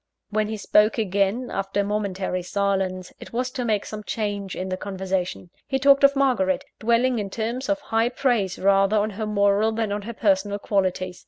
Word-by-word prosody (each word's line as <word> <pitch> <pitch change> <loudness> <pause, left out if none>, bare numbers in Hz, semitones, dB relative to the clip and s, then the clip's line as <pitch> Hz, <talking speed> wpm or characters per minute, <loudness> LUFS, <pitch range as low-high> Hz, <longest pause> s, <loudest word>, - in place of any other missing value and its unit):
When 215 0 +1
he 220 0 -4
spoke 210 +1 +3
again, 200 +3 0
after 195 +1 -1
a - - 0
momentary 195 -3 -2
silence, 190 -1 -1
it - - -11
was 250 +2 -1
to 250 - -3
make 215 -4 0
some 215 -1 -7
change 205 -3 -3
in 185 +1 -4
the 185 - -1
conversation. 190 -2 -3 0.2
He 270 - 0
talked 275 +1 +5
of 280 0 +6
Margaret 245 -9 +1
dwelling 235 +2 +2
in 200 -2 -3
terms 235 +6 -3
of 295 0 +1
high 225 -2 +1
praise 240 -8 0
rather 195 +2 +3
on 210 +1 +1
her 215 +2 -4
moral 205 +1 +2
than 220 -2 -2
on 205 +1 -2
her 230 +4 -6
personal 205 -2 +1
qualities. 185 -3 -1
205 Hz, 190 wpm, -24 LUFS, 195-230 Hz, 0.2 s, of